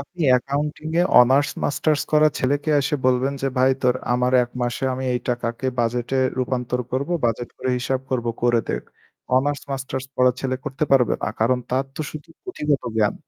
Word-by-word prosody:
আপনি 170 +5 -7
অ্যাকাউন্টিং 140 +4 0
এ - - +5 0.2
honours 135 +4 +4
masters 150 0 +1
করা 155 0 +6
ছেলেকে 145 +4 0
এসে 140 +2 -1
বলবেন 130 +2 +2
যে, 135 - +1
"ভাই 130 +1 +5
তোর 125 -1 +3 0.2
আমার 125 +1 +1
১ 120 - -5
মাসে 120 +2 -2
আমি 130 +1 -4
এই 125 - -1
টাকাকে 120 +1 -2
বাজেটে 120 +2 0 0.2
রূপান্তর 125 -1 -1
করব। 135 +4 -1 0.2
বাজেট 120 +1 0
করে 130 - -2
হিসাব 130 +1 -1
করব 125 -2 -1 0.2
করে 120 -1 +3
দেখ।" - - -2 0.5
অনার্স 145 +2 +1
মাস্টার্স 135 -1 -4
পড়া 125 0 +4
ছেলে 130 -1 -1
করতে 135 +3 -2
পারবে 125 -3 +4
না। - - 0
কারণ 125 +3 +3
তার 130 +2 +1
তো - - -6
শুধু 155 +1 -9 0.2
পুথিগত 150 - -1
জ্ঞান। 105 -2 +2
130 Hz, 180 wpm, -22 LUFS, 125-140 Hz, 0.5 s, করা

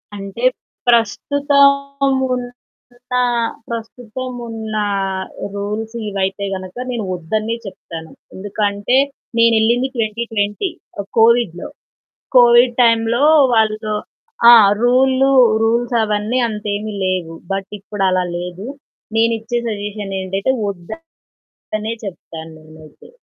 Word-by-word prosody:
అంటే 200 +3 -7 0.4
ప్రస్తుతం 280 +4 +2 0.2
ఉన్న 245 -1 -4 1.2
ప్రస్తుతం 235 +2 -6 0.2
ఉన్న 220 -1 -6 0.8
రూల్స్ 210 +3 -4
ఇవైతే 195 0 -2
గనక 185 -1 -7 0.2
నేను 235 -3 -3
వద్దనే 215 +7 -2
చెప్తాను. 165 -4 -9 0.2
ఎందుకంటే 205 +3 0 0.4
నేనెళ్ళింది 230 +2 +3
2020 225 - -1 0.5
కోవిడ్‌లో. 225 -6 +3 0.7
కోవిడ్ 240 0 +6
టైంలో 230 +2 +2 0.3
వాళ్ళు 215 -1 +1 0.6
ఆ! - - +11 0.3
రూళ్ళు 260 +2 +3 0.3
రూల్సవన్నీ 225 -1 +1
అంత 210 -2 -6
ఏమి 215 +1 -4
లేవు. 180 -3 -2 0.2
బట్ 195 0 -3
ఇప్పుడలా 190 -2 0
లేదు. 180 +3 -6 0.5
నేనిచ్చే 230 +1 +1
సజెషన్ 205 -2 -4
ఏంటంటే 195 +6 -1
వద్దనే 200 - -8 0.9
చెప్తాను 165 -4 -8
నేనైతే. 155 -1 -16
220 Hz, 85 wpm, -18 LUFS, 195-240 Hz, 1.2 s, ఆ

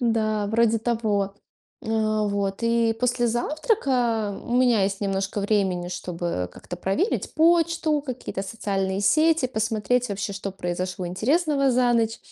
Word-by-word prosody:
Да, 215 -3 +1
вроде 230 0 +3
того. 215 -4 -1 0.5
Э, - - -8 0.4
вот. 200 -1 -1
И 230 -1 +2
после 245 -1 +1
завтрака 240 - 0
у 235 - -5
меня 245 -5 +4
есть 195 0 -1
немножко 195 0 -1
времени, 190 -4 0
чтобы 170 - -4
как-то 175 - -8
проверить 305 - -1
почту, 330 -2 +3
какие-то 255 -7 -5
социальные 195 -2 -2
сети, 310 +6 +3
посмотреть 225 +1 0
вообще, 200 +1 -3
что 195 0 -4
произошло 180 0 -4
интересного 275 - +1
за 245 0 +3
ночь. 225 -1 +1
220 Hz, 130 wpm, -24 LUFS, 195-250 Hz, 0.5 s, меня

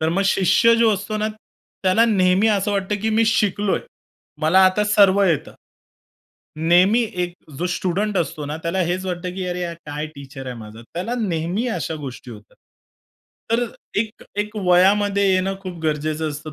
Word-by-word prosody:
तर 160 - +1
मग 190 +4 +1
शिष्य 195 +5 +4
जो 230 -2 +4
असतो 210 +3 -4
ना, 215 0 -1 0.5
त्याला 190 +5 +4
नेहमी 195 -1 +3
असं 205 -1 +1
वाटतं 200 +1 -1
की 220 - +1
मी 225 +1 +3
शिकलोय. 205 -2 +1 0.6
मला 165 +5 +4
आता 210 +3 +1
सर्व 200 -1 +4
येतं. 165 -6 0 1.0
नेहमी 180 +8 +4 0.2
एक 175 0 -3 0.3
जो 180 - -1
स्टुडंट 195 +3 -1
असतो 155 -1 -3
ना, 150 +2 -4
त्याला 170 +3 -2
हेच 185 +1 -2
वाटतं 180 0 -4
की 185 -1 -4
अरे 180 0 -3
हा 170 - -5
काय 150 +1 -4
टीचर 135 -1 -10
आहे 125 - -5
माझा 110 0 -10
त्याला 220 +8 -3
नेहमी 185 +3 -1
अशा 165 -6 -3
गोष्टी 130 -4 -8
होतात. 105 -2 -13 1.0
तर 235 +1 +2 0.4
एक 220 -1 -5 0.2
एक 210 +1 -3
वयामध्ये 200 +2 +3
येणं 190 +1 +1
खूप 185 -3 -7
गरजेचं 155 0 -1
असतं 150 +1 -8
185 Hz, 165 wpm, -21 LUFS, 160-210 Hz, 1.0 s, शिष्य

